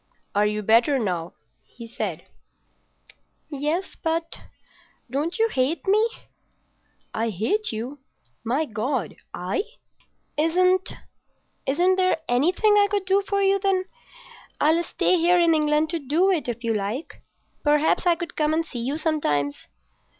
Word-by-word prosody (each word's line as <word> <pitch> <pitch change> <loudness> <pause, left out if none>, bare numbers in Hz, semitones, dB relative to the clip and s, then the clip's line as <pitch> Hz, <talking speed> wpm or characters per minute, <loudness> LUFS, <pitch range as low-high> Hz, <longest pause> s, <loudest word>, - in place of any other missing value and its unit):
"Are 205 +1 +3
you 210 0 -2
better 235 +7 +4
now?" 180 -8 -2 0.3
he 235 -1 -12
said. 230 - -4 1.3
"Yes, 300 +6 -2
but—don't 325 -2 -5
you 450 - +3
hate 275 - -1
me?" 430 +4 +3 1.0
"I 225 +1 -1
hate 225 - -1
you? 245 +6 -5 0.4
My 260 +7 0
God! 230 - -2 0.2
I?" 180 - -2 0.8
"Isn't—isn't 365 0 0
there 370 -2 +2
anything 355 - +3
I 405 0 +5
could 400 -1 -1
do 385 +1 +3
for 400 0 -1
you, 390 0 +3
then? 385 -1 +1 0.7
I'll 320 +3 +3
stay 360 +1 +1
here 350 +1 +4
in 335 -1 +4
England 305 0 +2
to 335 - -1
do 320 +7 +2
it, 335 -8 0
if 240 0 -4
you 230 -1 +1
like. 215 +8 -4 0.4
Perhaps 300 +4 +2
I 345 - +5
could 340 0 -7
come 305 0 +1
and 330 0 0
see 250 - -6
you 265 +6 -2
sometimes." 150 - 0
305 Hz, 135 wpm, -24 LUFS, 240-365 Hz, 1.3 s, I